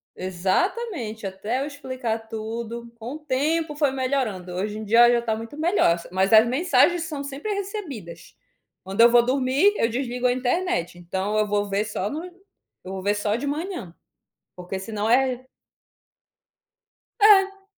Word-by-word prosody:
exatamente. 220 - -2
Até 210 +7 -3
eu - - -1
explicar 255 -6 -4
tudo, 230 +1 -6
com 235 +4 -7
o - - -8
tempo 300 +2 -1
foi 290 -2 +2
melhorando, 255 -9 -2
hoje 205 +3 -3
em - - -6
dia 225 +3 +3
ela 240 - +5
já 235 - +1
tá 225 -2 -1
muito 225 +6 -8
melhor, 320 - +3
s 170 - -11
mas 190 +3 +1
as 220 +1 +8
mensagens 345 +5 +3
são 295 -3 -5
sempre 285 +10 -4
recebidas. 310 - -7 0.5
Quando 195 +4 0
eu 235 - +9
vou 240 0 +5
dormir, 270 +9 +3
eu 230 - +2
desligo 245 0 -1
a 245 - +2
internet, 255 - -1
então 190 +4 -3
eu 215 0 +2
vou 205 0 0
ver 200 +2 0
só 210 -1 -3
no 315 +4 -5
eu 360 - -15
vou 190 - -5
ver 205 +2 +1
só 205 +1 0
de 275 +4 -3
manhã, 300 - -4 0.6
porque 180 +2 -6
senão 210 +1 -3
é 255 +1 +2 1.7
É. 395 -1 +5
240 Hz, 165 wpm, -24 LUFS, 205-295 Hz, 1.7 s, eu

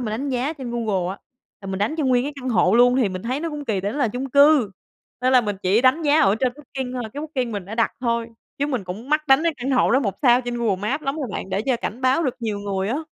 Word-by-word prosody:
mình 230 -4 -3
đánh 250 +7 -3
giá 260 +3 -1
trên 265 -6 -7
Google 210 -7 -1
á 195 - -7 0.4
là 195 - -10
mình 190 0 -3
đánh 205 +9 0
cho 295 - +1
nguyên 250 -1 +2
cái 290 - -4
căn 255 - -4
hộ 200 -4 +3
luôn 245 +2 +5
thì 245 -6 +2
mình 185 -1 -6
thấy 255 +5 -2
nó 335 - -2
cũng 295 -1 -6
kỳ, 205 -6 -1
tại 200 +2 -2
nó 290 - -5
là 250 - +2
chung 255 +4 -5
cư 280 -6 +5 0.5
nên 255 +1 +2
là 255 - +7
mình 205 -4 -3
chỉ 195 +4 +3
đánh 260 +6 +3
giá 295 +1 +4
ở 195 +1 +4
trên 255 -2 +1
Booking 265 -3 -6
thôi, 250 - -3
cái 290 - -5
Booking 260 -7 -3
mình 200 -3 -4
đã 205 +4 -7
đặt 230 0 +1
thôi 235 -2 0 0.3
chứ 285 - +1
mình 250 -9 -2
cũng 200 +8 -7
mắc 305 0 +1
đánh 270 +3 +5
cái 335 -1 +1
căn 255 +1 -3
hộ 260 - +3
đó 260 +3 +4
1 200 -7 -1
sao 245 -2 +5
trên 245 -1 -4
Google 230 -5 0
Maps 225 +10 -2
lắm 275 +3 -2
rồi 290 - -3
bạn 190 - -5
để 195 +2 -1
cho 255 - +2
cảnh 230 +1 -5
báo 260 +5 +2
được 260 -6 -1
nhiều 215 -3 -2
người 200 -1 -2
á. 275 +8 -1
245 Hz, 305 wpm, -22 LUFS, 210-275 Hz, 0.5 s, là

